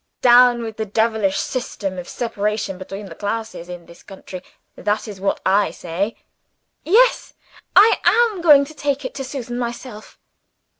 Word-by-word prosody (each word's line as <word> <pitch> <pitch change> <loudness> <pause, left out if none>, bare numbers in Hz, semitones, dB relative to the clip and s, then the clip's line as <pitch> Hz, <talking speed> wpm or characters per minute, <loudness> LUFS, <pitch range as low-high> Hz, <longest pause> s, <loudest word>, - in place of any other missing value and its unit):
Down 245 -1 +6
with 225 -1 -7
the 220 - -2
devilish 220 -2 0
system 200 -7 -4
of 175 - -9
separation 210 -4 -3
between 195 +2 -8
the 180 - -10
classes 205 -2 -5
in 175 -1 -8
this 170 +1 -16
country 190 -2 -10 0.3
that 210 +2 -2
is 200 -3 -9
what 195 - 0
I 200 +2 +3
say! 185 +6 -4 0.7
"Yes; 455 +10 +3 0.4
I 430 +3 +6
am 455 -6 +3
going 295 -4 +6
to 310 - -12
take 285 -2 -2
it - - -5
to 270 - -5
Susan 250 -3 -5
myself." 235 -2 -7
220 Hz, 155 wpm, -20 LUFS, 195-255 Hz, 0.7 s, Down